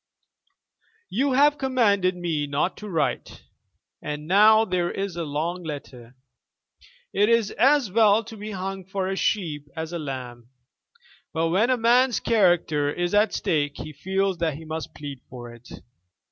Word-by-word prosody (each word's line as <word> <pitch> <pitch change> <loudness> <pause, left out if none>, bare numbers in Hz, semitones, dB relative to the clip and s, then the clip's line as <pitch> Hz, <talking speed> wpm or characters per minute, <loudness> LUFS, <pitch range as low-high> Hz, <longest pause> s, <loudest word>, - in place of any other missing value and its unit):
"You 270 +3 +1
have 290 +2 +4
commanded 205 -9 +2
me 165 -5 -2
not 145 +6 -1
to 210 - -8
write, 165 -4 -2 0.6
and 150 +1 -5
now 215 +4 +6
there 180 -3 -1
is 195 -2 -4
a 170 - -3
long 160 +5 -3
letter! 135 -6 -8 1.0
It 205 +2 +3
is 230 -3 +2
as 270 -5 +3
well 220 +1 +4
to 225 - -10
be 210 0 -7
hung 195 -1 -5
for 190 +1 -3
a 195 - -2
sheep 155 -8 -1
as 160 +1 -5
a 170 - -3
lamb. 125 -5 -7 0.8
But 165 0 0
when 200 +8 +2
a 255 - +3
man's 245 +2 +3
character 175 -9 +2
is 175 +3 -2
at 210 +1 +4
stake 145 -3 -1
he 155 - -7
feels 190 +4 -1
that 160 -3 0
he 160 +2 -10
must 160 0 -6
plead 140 -3 -8
for 120 -2 -9
it. 120 +1 -16
180 Hz, 160 wpm, -24 LUFS, 150-210 Hz, 1.0 s, now